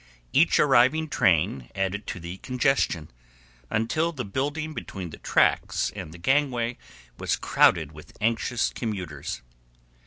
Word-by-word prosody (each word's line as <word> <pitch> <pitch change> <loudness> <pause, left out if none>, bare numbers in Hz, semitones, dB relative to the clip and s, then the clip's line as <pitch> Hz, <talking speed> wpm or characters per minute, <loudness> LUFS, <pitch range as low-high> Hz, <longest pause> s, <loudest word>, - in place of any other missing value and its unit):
Each 160 +5 +4
arriving 145 +3 +4
train 80 - +2
added 95 +2 -2
to - - -4
the 85 +2 -7
congestion, 125 - 0 0.6
until 155 +10 0
the 130 -7 -5
building 145 +9 -2
between 95 - -6
the - - -10
tracks - - +2
and 75 - -7
the 85 - -11
gangway 125 +2 +1 0.4
was - - 0
crowded 80 -3 +3
with 75 0 -14
anxious 115 +2 0
commuters. 90 - -5
115 Hz, 125 wpm, -26 LUFS, 85-135 Hz, 0.6 s, Each